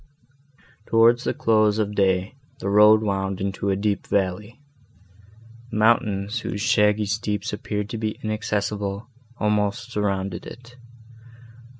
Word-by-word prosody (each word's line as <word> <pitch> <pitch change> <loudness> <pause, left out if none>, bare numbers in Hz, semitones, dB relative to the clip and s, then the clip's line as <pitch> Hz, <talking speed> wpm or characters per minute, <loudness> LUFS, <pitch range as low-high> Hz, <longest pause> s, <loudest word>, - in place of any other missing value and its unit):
Towards 115 +2 +4
the - - 0
close 110 -2 +2
of 105 -1 -1
day, 95 0 +1 0.2
the 100 - -4
road 105 +1 +6
wound 95 -2 -2
into 100 0 -2
a 95 - +2
deep 100 +1 -2
valley. 100 +4 -2 1.1
Mountains, 105 -1 +1
whose 105 - -5
shaggy 105 -1 +2
steeps 105 0 -2
appeared 105 0 -3
to 115 - -4
be 110 -1 -3
inaccessible, 105 0 -3 0.3
almost 105 +3 -1
surrounded 100 -3 -2
it. 125 0 -12
105 Hz, 115 wpm, -23 LUFS, 100-110 Hz, 1.1 s, road